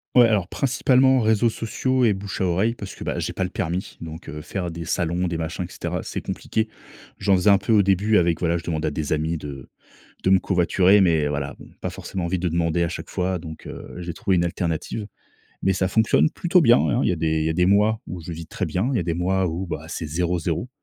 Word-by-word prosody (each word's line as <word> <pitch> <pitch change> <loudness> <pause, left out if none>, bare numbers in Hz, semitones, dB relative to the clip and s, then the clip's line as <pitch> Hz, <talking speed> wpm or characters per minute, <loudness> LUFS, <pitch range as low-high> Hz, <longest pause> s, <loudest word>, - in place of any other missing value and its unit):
Ouais, 120 -2 +8
alors 100 -5 +1
principalement 130 +1 +3
réseaux 110 0 +3
sociaux 125 +4 0
et 110 - +4
bouche 100 0 -6
à 95 - +1
oreille 95 +6 +1
parce 100 -4 -8
que - - -8
bah, - - -2
j'ai - - -3
pas - - -1
le 90 - -2
permis, 90 -1 -3
donc 80 0 -8
heu, 75 0 -6
faire 90 +2 -4
des 85 0 -6
salons, 85 +1 0
des 85 -1 -2
machins 80 +2 -3
et - - -8
cetera, - - -4
c'est - - -5
compliqué. 110 0 -2 0.5
J'en 100 0 +3
faisais 90 +3 +3
un 100 - +7
peu 110 +4 0
au 105 - +6
début 100 +2 +2
avec 85 -1 +2
voilà, 85 -1 +1
je 85 - -7
demandais 80 -2 -2
à - - -1
des 75 0 -3
amis 80 +2 0
de 70 -4 -8 0.6
de 95 - +3
me 95 -1 +6
covoiturer 95 +2 +3
mais 80 -5 +3
voilà, 70 -1 -3
bon - - -12
pas - - -3
forcément 95 -2 -5
envie 85 +1 -1
de 90 - 0
demander 85 0 +1
à 85 - +1
chaque 90 - -6
fois, 90 0 -1
donc 80 -2 -9
heu, - - -9
j'ai 85 -1 -5
trouvé 95 +3 0
une 85 - +2
alternative, 85 +4 -3 0.6
mais 95 - +2
ça 95 0 0
fonctionne 110 +8 +3
plutôt 175 +3 +2
bien, 120 -5 +6
hein. 120 - +1
Il - - +2
y - - +3
a 90 - -1
des, 80 0 +1
il - - 0
y - - +1
a - - 0
des 90 +2 +2
mois 105 +3 +3
où 90 -1 -6
je 80 - -7
vis 80 -1 -7
très 90 - -3
bien. 90 +7 -1
Il - - 0
y - - +2
a - - -1
des 85 0 -1
mois 95 +3 +1
où 90 +2 -3
bah, 80 -1 -5
c'est 85 - -4
0-0, 85 +5 -1
90 Hz, 260 wpm, -23 LUFS, 85-100 Hz, 0.6 s, Ouais